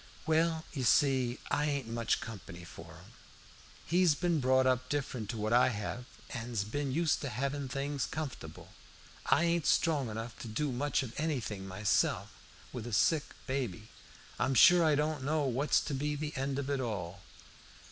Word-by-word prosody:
"Well, 160 0 +1
you 135 -4 -2
see, 130 -1 +3
I 150 - +2
ain't 140 -5 -1
much 115 -1 0
company 95 -6 -8
for 85 - -11
him. - - -16 0.7
He's 175 -3 +3
ben 170 0 +1
brought 130 0 +3
up 130 -1 +1
different 135 -7 -3
to 115 - -3
what 110 +1 -1
I 125 - +6
hev, 120 +2 -4 0.3
an's 115 -2 -3
ben 135 +6 -3
used 160 +3 +1
to 140 - -3
hevin' 135 +3 -2
things 140 0 -2
comfortable. 155 -4 -7 0.5
I - - +4
ain't 170 -3 +1
strong 145 -7 +2
enough 115 +2 -6
to - - -7
do 135 +6 -1
much 135 +2 0
of 120 -3 -7
anything 120 -11 -2
myself, 95 +2 +1 0.4
with 120 -2 -5
a 120 - -6
sick 150 +9 +3 0.2
baby. 120 -6 -3 0.5
I'm 130 +2 +1
sure 175 +5 +8
I 155 -2 +4
don't 150 -1 -1
know 150 +2 +1
what's 135 +2 +2
to 150 - -4
be 150 +2 -1
the 150 +1 -4
end 135 +1 -2
of 140 0 -2
it 140 - 0
all. 100 -5 -4
135 Hz, 175 wpm, -32 LUFS, 115-150 Hz, 0.7 s, sure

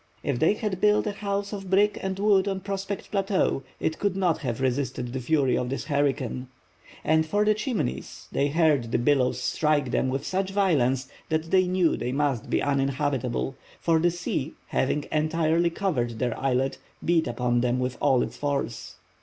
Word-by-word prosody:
If 135 -4 -1
they 165 +9 +4
had 210 -4 -3
built 210 0 +4
a 210 - 0
house 200 0 -3
of 195 -2 -6
brick 205 +2 +4
and 190 0 -3
wood 200 -1 +3
on 195 -1 -2
Prospect 195 0 -4
Plateau, 195 -7 +1 0.2
it 160 - -1
could 200 -2 0
not 180 -4 +1
have 125 -6 -3
resisted 130 -2 -1
the 130 - -2
fury 135 0 +2
of 125 - -1
this 135 - -3
hurricane. 140 -3 -1 0.6
As 160 0 +3
for 205 +5 +1
the 215 - +5
Chimneys, 215 - -3
they 140 - +1
heard 145 -6 +2
the - - +2
billows 125 0 +2
strike 145 +1 +1
them 130 - +1
with 135 +1 -2
such 190 +1 -1
violence 140 -10 +2 0.2
that 160 +1 -1
they 185 -1 +4
knew 180 -2 +2
they 125 - -3
must 140 -4 -1
be - - +1
uninhabitable, 135 -2 0 0.2
for 165 -1 +2
the 175 +2 +3
sea, 165 -4 -3
having 145 +2 0
entirely 160 +2 +2
covered 130 - -1
their 120 0 -1
islet, 135 0 0 0.3
beat 165 -1 +2
upon 120 0 0
them 125 0 +1
with 125 0 -1
all 135 -4 +4
its - - -6
force. 140 -8 -3
150 Hz, 180 wpm, -26 LUFS, 130-190 Hz, 0.6 s, the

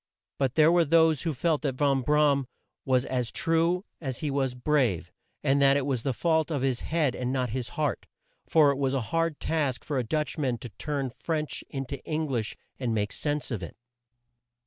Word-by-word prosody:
But 135 -1 0
there 155 +1 +6
were 175 0 +5
those 160 -2 +4
who 165 - -1
felt 155 +3 +1
that 140 -4 -1
Van 135 -1 +2
Bra 150 +2 +4
am 140 -2 -1 0.4
was 130 -2 +2
as 125 -2 -2
true 165 +3 +1
as 135 -6 -4
he 150 - -2
was 135 -2 0
brave, 125 - +1 0.3
and 140 +1 +3
that 140 0 +5
it 140 - -1
was 135 -4 -1
the 135 - -1
fault 160 +4 +1
of 145 -5 -1
his 130 -3 +1
head 155 -6 0
and 125 0 -2
not 130 -3 -1
his 125 0 -3
heart, - - -1 0.4
for 150 -3 +6
it 140 - -3
was 135 -1 +1
a 135 - +1
hard 165 -2 +1
task 145 -8 -1
for 145 -4 -1
a - - 0
Dutch 150 +6 -2
man 130 -5 0
to 120 - -8
turn 135 - -3
French 150 +5 -3
in 135 -1 -4
to 140 +1 -6
Eng 155 0 -1
lish, 115 -5 -2 0.2
and 120 -4 -1
make 105 -1 -1
sense 145 -2 -2
of 110 -6 -2
it. 85 - -8
140 Hz, 215 wpm, -27 LUFS, 125-155 Hz, 0.4 s, there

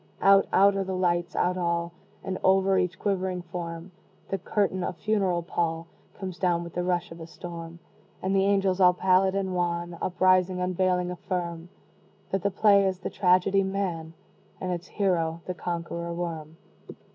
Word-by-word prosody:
Out 195 0 +5
out 200 0 +5
are 195 - 0
the 190 0 -3
lights 175 -1 0
out 180 +1 +1
all: 170 -1 -1 0.3
And 190 -1 -3
over 190 0 +4
each 180 0 -1
quivering 185 -3 -1
form, 170 0 -6 0.4
The 195 - -2
curtain, 190 0 0
a - - -2
funeral 185 -2 0
pall, 165 -1 -2 0.3
Comes 185 -3 -6
down 175 -2 +1
with 170 0 -9
the 175 - -1
rush 175 -1 -1
of 165 - -10
a 160 - -8
storm 170 -1 -8 0.4
And 190 +1 -1
the 195 - +4
angels, 195 -1 +2
all 180 -1 +6
pallid 190 +1 +3
and 190 -1 -1
wan, 175 -1 -2
Uprising, 185 0 +2
unveiling, 180 0 0
affirm 175 -2 -4 0.6
That 195 - 0
the 200 - +1
play 200 0 +4
is 190 -1 -1
the 185 - -5
tragedy, 190 +1 +3
"Man," 190 -5 -3 0.5
And 185 - -3
its 175 -1 -4
hero, 170 -5 0
the 180 - -3
conqueror 170 -1 -4
Worm. 165 -2 -5
180 Hz, 170 wpm, -27 LUFS, 170-190 Hz, 0.6 s, all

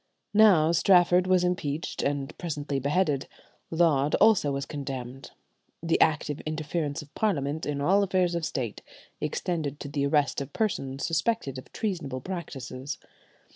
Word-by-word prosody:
Now 195 -7 +6
Strafford 180 0 +4
was 185 -1 +4
impeached 165 -3 -2
and 140 0 -2
presently 145 -4 -3
beheaded; 145 0 +1 0.4
Laud 155 -4 +3
also 205 -9 +4
was 140 0 -2
condemned. 135 -3 -6 0.5
The 165 0 +1
active 150 -2 +2
interference 155 -1 -3
of 145 - -19
Parliament 155 -7 -1
in 145 -1 -2
all 190 +7 +4
affairs 185 -3 +1
of 170 -1 -2
State 125 -8 -3 0.4
extended 155 -5 -2
to - - -6
the 140 -1 -1
arrest 145 -1 +1
of 140 +1 -7
persons 135 -11 -1
suspected 165 - -1
of - - -14
treasonable 170 -11 -3
practices. 140 -6 -6
150 Hz, 135 wpm, -27 LUFS, 140-175 Hz, 0.5 s, Now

